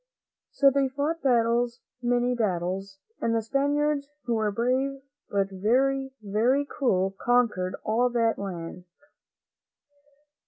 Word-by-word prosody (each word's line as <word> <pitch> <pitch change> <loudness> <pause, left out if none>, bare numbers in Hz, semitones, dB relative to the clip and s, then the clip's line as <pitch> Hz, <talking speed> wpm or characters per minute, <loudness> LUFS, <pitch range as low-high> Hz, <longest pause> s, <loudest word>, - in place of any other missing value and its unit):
So 275 -1 +4
they 275 0 +2
fought 295 +5 -2
battles, 240 -1 +2 0.2
many 245 0 +1
battles, 195 -3 -2 0.2
and 230 0 +1
the 225 - +1
Spaniards, 285 +3 0 0.2
who 240 -1 -1
were 215 -2 +1
brave, 255 +5 0 0.3
but 195 -1 0
very, 265 +7 +1
very 235 +8 +2
cruel, 195 -10 0
conquered 225 -7 +2
all 235 +3 +2
that 230 -2 +1
country. 180 -2 -6
240 Hz, 115 wpm, -27 LUFS, 200-270 Hz, 0.3 s, So